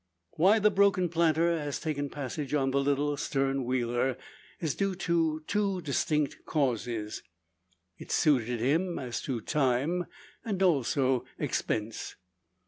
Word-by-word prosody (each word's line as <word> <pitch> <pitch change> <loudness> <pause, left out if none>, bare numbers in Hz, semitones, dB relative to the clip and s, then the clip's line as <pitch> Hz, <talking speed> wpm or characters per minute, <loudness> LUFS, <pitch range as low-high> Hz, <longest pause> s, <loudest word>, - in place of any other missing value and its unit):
Why 195 +7 +4
the 210 -1 +4
broken 190 -2 +3
planter 165 0 +2
has 145 -3 -3
taken 145 -3 -2
passage 145 +1 -4
on 135 -2 +1
the 140 - +2
little 145 +1 +1
"stern 135 -1 0
wheeler" 120 0 0 0.4
is 160 -5 -1
due 195 -1 -1
to 165 -3 0
two 200 -1 0
distinct 150 -1 -1
causes. 120 -6 -1 0.8
It - - -9
suited 125 -6 +2
him 165 +9 +1
as 125 -3 -4
to 125 -4 -3
time, 145 +8 0 0.4
and 195 -4 -1
also 135 -6 +2
expense. 110 +1 -2
145 Hz, 130 wpm, -29 LUFS, 130-170 Hz, 0.8 s, Why